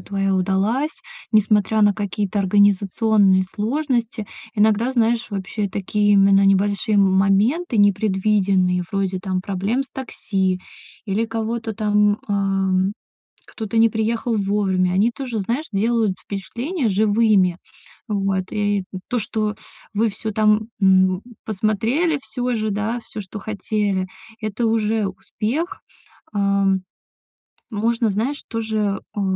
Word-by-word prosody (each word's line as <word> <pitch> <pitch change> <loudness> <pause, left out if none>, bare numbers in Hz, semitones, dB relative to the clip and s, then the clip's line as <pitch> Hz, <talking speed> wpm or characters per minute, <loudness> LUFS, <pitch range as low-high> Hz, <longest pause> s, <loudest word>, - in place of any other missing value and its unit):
твоя 195 -1 -1
удалась, 195 - 0 0.3
несмотря 215 0 +3
на 205 0 +5
какие-то 205 0 -2
организационные 200 0 +3
сложности. 235 +2 -2 0.3
Иногда, 220 +4 +2
знаешь, 235 -1 +1
вообще 200 +1 -3
такие 205 +2 0
именно 195 0 +5
небольшие 200 +2 +2
м 195 -2 +4
моменты 210 - +2
непредвиденные, 195 -2 +2
вроде 195 -1 -1
там 185 -1 -2
проблем 200 +7 -1
с 275 - -15
такси 190 -7 -2 0.4
или 210 +2 0
кого-то 225 0 -3
там, 210 -1 +2
а, - - -1
м, 195 -1 +1 0.5
кто-то 225 0 -3
не 230 - +6
приехал 225 +1 -1
вовремя, 195 -3 +1
они 205 +6 +3
тоже, 240 -4 -4
знаешь, 240 +10 -2
делают 220 -1 +1
впечатление 240 - -3
живыми. 205 -3 +3 0.5
Вот. 195 -2 -1
И 205 -2 0 0.2
то, 245 - 0
что 215 0 -2 0.4
вы 225 +2 +2
всё 215 +2 -5
там, 215 +1 +2
м, 185 0 +4 0.2
посмотрели 225 - 0
всё 245 -1 -2
же, 215 -1 -1
да, 215 +4 -2
всё, 215 - -8
что 195 +3 -8
хотели- 205 -2 -1 0.4
это 215 +2 -1
уже 220 -1 +1
успех. 235 - -4 0.5
А. 200 -1 +2 1.1
Можно, 230 +1 +1
знаешь, 245 +9 -2
тоже, 220 -3 -1 0.2
а, - - -1
210 Hz, 120 wpm, -21 LUFS, 195-225 Hz, 1.1 s, не